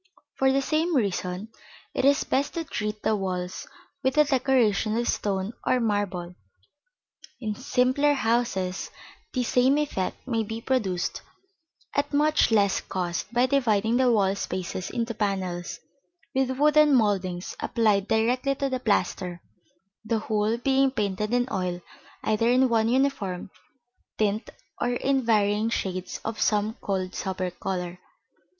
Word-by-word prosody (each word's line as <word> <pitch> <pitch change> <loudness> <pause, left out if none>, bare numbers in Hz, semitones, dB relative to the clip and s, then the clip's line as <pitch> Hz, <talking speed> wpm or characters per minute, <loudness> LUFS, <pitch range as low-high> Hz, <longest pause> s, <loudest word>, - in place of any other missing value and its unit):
For 265 0 +2
the 275 +1 +1
same 320 +4 +1
reason, 195 -3 -1 0.4
it - - 0
is 280 0 +4
best 275 +5 -1
to 335 - -1
treat 210 -7 -4
the 220 - +2
walls 185 -2 -4 0.3
with 260 +3 0
a 300 - +8
decoration 250 -6 +2
of 240 - 0
stone 195 +1 -1
or 255 - +2
marble. 205 -6 -1 1.1
In 215 -4 -2
simpler 260 +4 +2
houses 225 -7 0 0.4
the 255 - 0
same 255 +4 +3
effect 270 -8 -2
may 230 -3 0
be 225 +1 -4
produced 205 -8 -1 0.7
at 285 0 0
much 300 -2 +3
less 205 -3 +3
cost 180 +2 -3
by 245 +1 +3
dividing 230 -4 +2
the 255 -1 +4
wall 195 -4 +3
spaces 185 -1 -4
into 230 -1 -2
panels, 190 -4 -2 0.5
with 260 -1 0
wooden 300 0 +5
mouldings 190 -6 0
applied 215 -4 +1
directly 250 +5 +1
to 275 0 -1
the 260 -1 -2
plaster, 190 -6 0 0.6
the 225 +1 0
whole 215 +1 0
being 270 +2 +3
painted 210 -3 -2
in 245 0 +2
oil, 180 -2 -2 0.4
either 225 +2 +2
in 255 +1 +4
one 225 -1 +2
uniform 235 -9 0 0.7
tint 215 +1 0 0.3
or 245 - +1
in 270 +2 +1
varying 210 -1 +2
shades 185 -4 -3
of 225 0 -3
some 210 0 +2
cold 185 -2 -2
sober 185 -1 -3
color. 180 -1 -4
220 Hz, 140 wpm, -26 LUFS, 195-260 Hz, 1.1 s, a